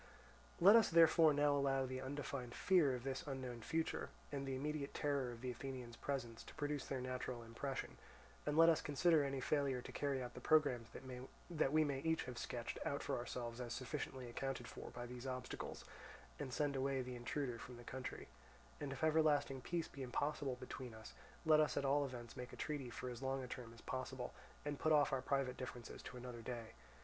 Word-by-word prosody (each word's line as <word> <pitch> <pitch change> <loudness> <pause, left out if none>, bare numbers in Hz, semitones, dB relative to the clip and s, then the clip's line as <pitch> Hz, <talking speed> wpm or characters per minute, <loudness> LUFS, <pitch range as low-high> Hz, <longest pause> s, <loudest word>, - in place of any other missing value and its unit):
"Let 200 +5 +10
us 230 - +7
therefore 165 -1 +7
now 145 0 +4
allow 135 -1 +2
the 130 0 -3
undefined 130 -2 -4
fear 165 -9 +4
of 120 - -6
this 135 0 -2
unknown 130 -4 -4
future, 160 +8 -1 0.2
and 140 -1 -2
the 135 - -1
immediate 145 +1 -2
terror 140 -4 +1
of 115 -1 -9
the 125 -1 -2
Athenians' 125 -1 -6
presence, 120 -5 -3
to - - -11
produce 145 -2 -1
their 135 - -1
natural 125 -1 -3
impression, 125 +4 -4 0.4
and 150 +1 0
let 165 0 +9
us 165 -2 +5
consider 150 +2 +4
any 135 -1 -1
failure 140 -2 +1
to - - -7
carry 140 -2 0
out 120 - -6
the - - -8
programmes 145 -7 +4 0.6
that 155 -5 +2
we 155 +1 +5
may 140 -3 0
each 160 +2 +1
have 125 -2 -6
sketched - - -3
out - - -1
for - - 0
ourselves 120 0 -4
as 120 -1 -3
sufficiently 130 -1 -4
accounted 125 0 -3
for - - -7
by 120 - -6
these 125 +1 -6
obstacles, 130 0 -4 0.5
and 140 -3 -3
send 145 +1 +1
away 135 0 +1
the 125 0 -5
intruder 120 0 -2
from 125 -1 -8
the 120 - -10
country; 130 +2 -5 0.5
and 145 -2 -3
if 135 +2 -5
everlasting 150 -4 +4
peace 170 +3 -1
be 140 - -9
impossible 135 +1 -1
between 125 -3 -6
us, 110 0 -10 0.3
let 155 -1 +7
us 155 - +3
at 140 - +1
all 140 +1 +4
events 120 -3 -7
make 125 -1 -6
a - - -8
treaty 145 -5 -2
for 125 +1 -4
as 120 0 -7
long 135 0 0
a - - -5
term 120 -2 -6
as 115 - -13
possible, 130 -1 -3 0.3
and 145 -1 -2
put 155 - +2
off 150 -2 +5
our 130 - +2
private 135 -1 0
differences 125 -2 -6
to 125 - -8
another 125 -1 -6
day. 115 -1 -5
135 Hz, 205 wpm, -40 LUFS, 125-145 Hz, 0.6 s, Let